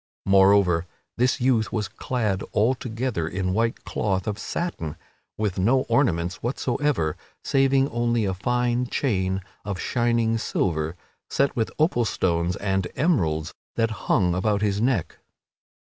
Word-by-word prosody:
Moreover, 95 -3 +4 0.3
this 125 +1 +2
youth 120 -3 +2
was 110 -3 -1
clad 110 -6 -2
altogether 115 -5 0
in 90 +1 -2
white 115 +3 0
cloth 95 -3 -1
of 105 0 -3
satin 115 - -3 0.4
with 105 -3 -1
no 120 +8 +3
ornaments 100 - 0
whatsoever 125 - 0 0.3
saving 135 0 +3
only 120 -1 +1
a 95 - 0
fine 125 +5 0
chain 95 -8 0 0.2
of 100 -3 -4
shining 115 -1 +1
silver 80 -6 -1 0.3
set 140 0 +1
with 115 -2 0
opal 150 -7 +2
stones 85 -3 0
and 95 -2 -1
emeralds 80 - +1 0.2
that 115 -1 +1 0.2
hung 90 -3 +3
about 100 +3 0
his 100 0 +1
neck. 110 -9 0
110 Hz, 130 wpm, -24 LUFS, 95-120 Hz, 0.4 s, Moreover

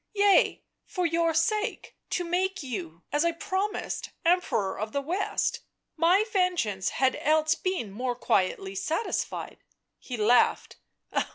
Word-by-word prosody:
" - - -52
Yea, 405 -1 +4 0.2
for 365 -3 -2
your 335 0 +2
sake, 420 +8 -1
to 355 - -1
make 370 +1 -1
you, 180 -10 -6
as 295 +2 +2
I 340 - +3
promised, 405 +3 -3 0.2
Emperor 335 - +1
of 215 +1 -4
the 280 - +1
West 360 +8 -1 0.2
— - - -55
my 350 +6 +4
vengeance 325 - +1
had 260 0 +3
else 310 +1 +3
been 355 - -3
more 245 +4 -2
quietly 195 -4 0
satisfied 315 - -3 0.2
" - - -55
He 250 - -6
laughed. 225 +3 +3
325 Hz, 145 wpm, -27 LUFS, 235-370 Hz, 0.2 s, Yea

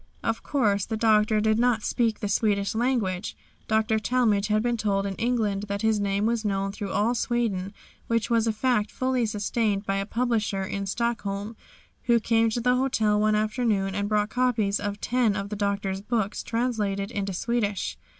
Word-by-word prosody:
Of 225 0 -1
course 205 -8 +1
the 220 - -2
Doctor 215 -1 +3
did 220 +1 +2
not 240 -3 +2
speak 230 -3 0
the 205 - -1
Swedish 200 -1 +1
language. 220 -6 -1 0.3
Dr. 220 0 +2
Talmage 215 -2 +1
had 215 0 +1
been 240 0 +1
told 200 -3 0
in 195 - -2
England 215 -4 0
that 200 +1 -3
his 220 -1 +2
name 200 0 0
was 230 0 0
known 195 -1 -1
through 200 0 -5
all 225 +4 +1
Sweden, 225 -6 -1 0.4
which 230 -2 +1
was 230 -1 +2
a - - +3
fact 220 -1 +1
fully 255 -2 0
sustained 210 -1 -1
by 195 0 0
a 195 0 -2
publisher 225 -5 0
in 195 +1 -4
Stockholm 210 -1 -2 0.5
who 235 -1 +4
came 225 0 +2
to 235 +2 -2
the 250 +1 +3
hotel 220 -5 +1
one 215 0 +3
afternoon 215 -3 0
and 200 +1 -2
brought 210 0 +1
copies 225 -5 +1
of 205 0 -4
ten 240 -4 +1
of 200 -1 -4
the 210 - -4
Doctor's 200 -1 -1
books 215 -1 -1
translated 215 -4 -1
into 200 -3 -2
Swedish. 205 +1 -1
215 Hz, 180 wpm, -26 LUFS, 200-235 Hz, 0.5 s, who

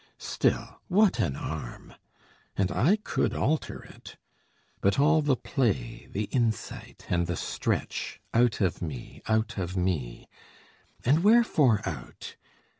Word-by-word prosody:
Still, - - -1
what 200 +1 +4
an 70 -7 +1
arm! 75 -5 -6 0.6
and 95 -1 +1
I 165 - +4
could 210 - -1
alter 155 +3 -1
it: - - -13 0.6
But 100 - +2
all 155 +2 +5
the 145 -3 +2
play, 115 - -1
the 105 - -2
insight, 115 -4 -2
and 85 -1 +1
the 85 - -1
stretch - - -2
Out 120 -2 +3
of 95 -4 0
me, 75 -8 -6
out 110 -1 0
of 90 +1 -3
me! 80 -10 -2 0.8
And 150 +7 +4
wherefore 155 - +4
out? 85 -6 -7
110 Hz, 125 wpm, -28 LUFS, 90-145 Hz, 0.8 s, all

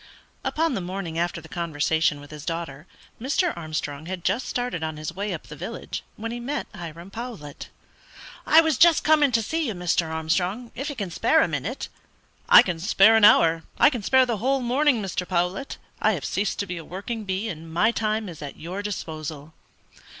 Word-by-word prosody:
Upon 325 -1 0
the 195 - -2
morning 175 -2 -4
after 170 0 -1
the 160 - -13
conversation 160 -2 0
with 145 +1 -13
his 150 -2 -9
daughter, 165 -2 -5 0.3
Mr. 315 +7 +1
Armstrong 155 -2 -5
had 185 -2 -5
just 220 +8 0
started 245 -8 -2
on 160 -1 -3
his 155 +1 -5
way 200 +3 -3
up - - -5
the - - -10
village - - -6
when 230 +2 -5
he 240 - -4
met 275 +5 -3
Hiram 170 +2 -9
Powlett. 220 - -7 0.8
"I 320 - +8
was 320 -5 0
just 340 -2 +6
coming 300 -3 +4
to 225 -2 +2
see 320 +6 -1
you, 220 - -3
Mr. 175 -2 0
Armstrong, 180 +9 -1
if 275 +5 -4
you 285 - -5
can 200 -7 -4
spare - - +3
a - - +1
minute." 165 - -4 0.6
"I - - +10
can 175 -3 -3
spare 195 +4 +5
an 220 -2 +7
hour 165 -4 +6 0.2
I 300 - +6
can 245 -5 -3
spare 260 +5 +4
the 235 -3 -1
whole 265 +5 +1
morning, 250 -1 +2
Mr. 180 -1 -3
Powlett. 180 +7 -1 0.2
I - - +4
have - - -4
ceased 200 +1 -1
to 200 - -1
be 180 -2 -5
a 165 - -7
working 210 +7 -5
bee, 195 +2 -2
and 165 -4 -7
my 175 +7 +3
time 215 -1 -1
is 165 -4 -9
at 145 -2 -7
your 180 +5 -5
disposal." 155 -6 -6
190 Hz, 200 wpm, -25 LUFS, 165-235 Hz, 0.8 s, I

